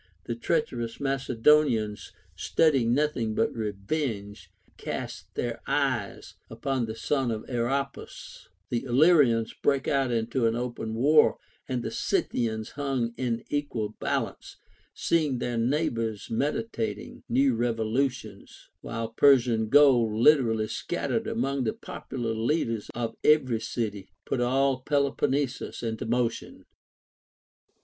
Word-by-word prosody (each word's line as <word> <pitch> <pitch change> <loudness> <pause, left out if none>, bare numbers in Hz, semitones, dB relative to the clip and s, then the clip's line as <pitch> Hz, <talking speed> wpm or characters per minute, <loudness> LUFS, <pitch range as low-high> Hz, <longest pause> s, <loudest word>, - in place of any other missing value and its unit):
The 120 - -2
treacherous 120 -3 -2
Macedo 135 +1 +3
nians, 105 -7 -2 0.3
studying 135 -8 +2
nothing 130 -7 0
but 115 - +1
revenge, 105 - -4 0.3
cast - - -6
their - - -3
eyes - - -1 0.2
upon 130 -4 -2
the 110 - -5
sons 135 -1 0
of 110 - -5
Aeropus; 135 +3 -4 0.2
the 120 -1 -1
Illyrians 130 -4 +4
brake 140 -1 0
out 135 -2 +1
into 115 +1 0
an 115 - 0
open 120 -2 -4
war; 150 +6 +4 0.3
and 125 -2 -2
the - - -4
Scythians 110 -2 -1
hung 135 -5 -2
in 120 -3 -2
equal 140 -7 -2
balance, - - -3 0.4
seeing 155 -6 +1
their 120 -1 -2
neigh 145 +8 +1
bors 115 -3 -4
meditating 115 - -3
new 135 +2 +3
revolutions; 115 -1 -2
while 115 -1 -4
Persian 115 -3 +4
gold, 130 -6 +5
lib 140 +7 +6
erally 110 -3 0
scattered - - -2
among 135 +3 -1
the 110 - 0
popular 120 -4 -5
leaders 115 -1 -1
of 115 -1 -3
every 130 -7 +4
city, 105 -5 -4 0.2
put 125 - -1
all 135 +2 +2
Peloponnesus 140 -2 -1
into 110 -1 -3
motion. 120 0 -2
120 Hz, 120 wpm, -27 LUFS, 115-140 Hz, 0.4 s, lib